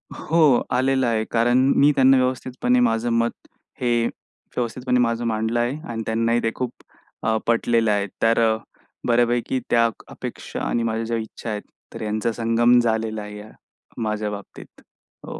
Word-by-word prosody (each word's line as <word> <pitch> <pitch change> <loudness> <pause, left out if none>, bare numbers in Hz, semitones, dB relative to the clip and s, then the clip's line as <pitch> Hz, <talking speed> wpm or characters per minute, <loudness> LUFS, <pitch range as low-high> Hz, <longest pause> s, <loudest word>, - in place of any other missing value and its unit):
हो. 155 -6 +3
आलेलं 130 0 +2
आहे. 110 -2 +1
कारण 120 +1 +3 0.2
मी 145 +1 +6
त्यांना 135 0 +6
व्यवस्थितपणे 125 -1 0
माझं 115 -1 +1
मत, 115 0 +2 0.5
हे 120 -2 +2
व्यवस्थितपणे 125 +1 -4
माझं 115 0 +1
मांडलं 110 +1 0
आहे. 120 +4 0
आणि 115 -1 -4
त्यांनाही 115 +1 +1
ते 115 - +1
खूप 125 -2 -3 0.5
अ, 110 0 +1
पटलेलं 115 -1 +2
आहे. 100 -1 0
तर 115 +1 +3 0.7
बऱ्यापैकी 120 +1 +2
त्या 115 0 +4 0.2
अपेक्षा - - -7
आणि 120 - 0
माझ्या 115 0 -1
ज्या 115 +1 -1
इच्छा 110 +1 -6
आहेत, 105 -1 -3 0.3
तर - - -7
यांचा 110 +1 -1
संगम 115 +2 +3
झालेला 110 -2 0
आहे 105 0 -8
या. 105 +1 -10 0.5
माझ्या 105 -1 -2
बाबतीत. 100 -1 -10 0.4
हो. - - -7
115 Hz, 150 wpm, -22 LUFS, 110-125 Hz, 0.7 s, मी